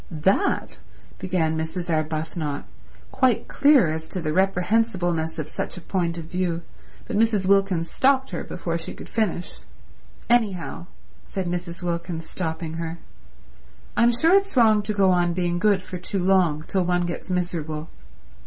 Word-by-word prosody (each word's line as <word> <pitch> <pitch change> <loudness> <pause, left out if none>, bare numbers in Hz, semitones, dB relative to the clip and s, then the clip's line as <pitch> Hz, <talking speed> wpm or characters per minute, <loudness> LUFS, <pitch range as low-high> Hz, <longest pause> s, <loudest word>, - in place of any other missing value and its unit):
"That—" 190 - 0 0.4
began 175 -4 0
Mrs. 160 +2 -3
Arbuthnot, 155 -2 -2 0.5
quite 260 -4 +2
clear 285 - +5
as 160 0 -4
to 185 - -4
the 155 -3 -2
reprehensibleness 180 -3 +1
of 155 -2 -3
such 155 - -4
a - - -7
point 170 -1 -1
of 165 - -6
view; 170 0 -2 0.4
but - - -4
Mrs. 215 -3 +2
Wilkins 195 -4 +2
stopped 265 0 +2
her - - -3
before 170 -2 -3
she 165 - -5
could - - -10
finish. 205 -6 -2 0.7
"Anyhow," 195 -8 0 0.4
said 190 -1 -3
Mrs. 175 0 -4
Wilkins, 170 -1 -3
stopping 160 -2 -4
her, 165 0 -4 1.0
"I'm 235 0 +5
sure 320 +9 +4
it's 395 -6 +3
wrong 220 -3 +6
to 210 +1 -2
go 195 -2 +4
on 175 -1 +2
being 175 -1 0
good 200 -1 +3
for 180 - -7
too 185 +3 -3
long, 180 -5 +3
till 190 +3 0
one 175 0 +1
gets 175 +2 -4
miserable. 165 -4 -2
180 Hz, 155 wpm, -24 LUFS, 165-200 Hz, 1.0 s, wrong